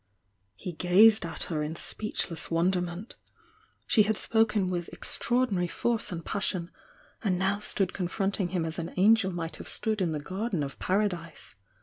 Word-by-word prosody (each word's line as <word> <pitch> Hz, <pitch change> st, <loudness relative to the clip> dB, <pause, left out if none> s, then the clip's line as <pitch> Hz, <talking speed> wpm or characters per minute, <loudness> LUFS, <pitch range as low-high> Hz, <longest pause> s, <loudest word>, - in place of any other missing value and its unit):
He 180 Hz, -, -6 dB
gazed 195 Hz, +6 st, +6 dB
a^ 165 Hz, -, -3 dB
her 155 Hz, -3 st, -2 dB
in 150 Hz, +2 st, -3 dB
speechless 170 Hz, -4 st, -2 dB
wonderment. 175 Hz, +3 st, -1 dB, 0.7 s
Sh« -, -, 0 dB
had 220 Hz, -1 st, +1 dB
spoken 210 Hz, -4 st, +2 dB
with 175 Hz, -1 st, -3 dB
extraordinary 235 Hz, -8 st, 0 dB
force 230 Hz, +3 st, -1 dB
and 170 Hz, -2 st, -5 dB
passion, 185 Hz, -3 st, -2 dB, 0.5 s
and 190 Hz, -4 st, +1 dB
now 195 Hz, +2 st, +1 dB
stood 195 Hz, -3 st, -1 dB
confronting 195 Hz, +1 st, -1 dB
him 175 Hz, -2 st, -1 dB
as 160 Hz, +1 st, -1 dB
an 170 Hz, +1 st, -5 dB
angel 205 Hz, 0 st, +5 dB
might 170 Hz, -2 st, -4 dB
have -, -, -7 dB
stood 215 Hz, -2 st, -1 dB
in 175 Hz, -3 st, +1 dB
the 155 Hz, -, -2 dB
Garden 190 Hz, +1 st, -2 dB
of 140 Hz, -1 st, -6 dB
Paradise. 180 Hz, -4 st, -1 dB
185 Hz, 155 wpm, -29 LUFS, 170-210 Hz, 0.7 s, gazed